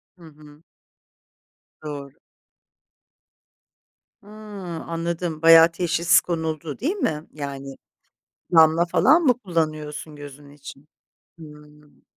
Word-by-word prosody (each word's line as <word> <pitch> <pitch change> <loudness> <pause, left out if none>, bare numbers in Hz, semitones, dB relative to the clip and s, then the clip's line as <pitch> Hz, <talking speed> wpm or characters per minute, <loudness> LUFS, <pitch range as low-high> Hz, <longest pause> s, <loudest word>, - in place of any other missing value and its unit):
Hı 175 - -19
hı. 150 -1 -17 1.2
Doğru. 145 -2 -8 2.1
Hıı, 205 - -17 0.6
anladım, 170 -1 -4
bayağı 165 0 +7
teşhis 175 0 +2
konuldu, 160 -3 -4
değil 320 - -1
mi? 160 - -3
Yani 140 -2 -7 0.8
damla 160 +1 +5
falan 310 - +3
mı 250 -5 +2
kullanıyorsun 155 -5 -4
gözün 145 0 -12
için? 140 0 -13 0.5
Hımm. 150 -1 -16
155 Hz, 90 wpm, -22 LUFS, 150-170 Hz, 2.1 s, bayağı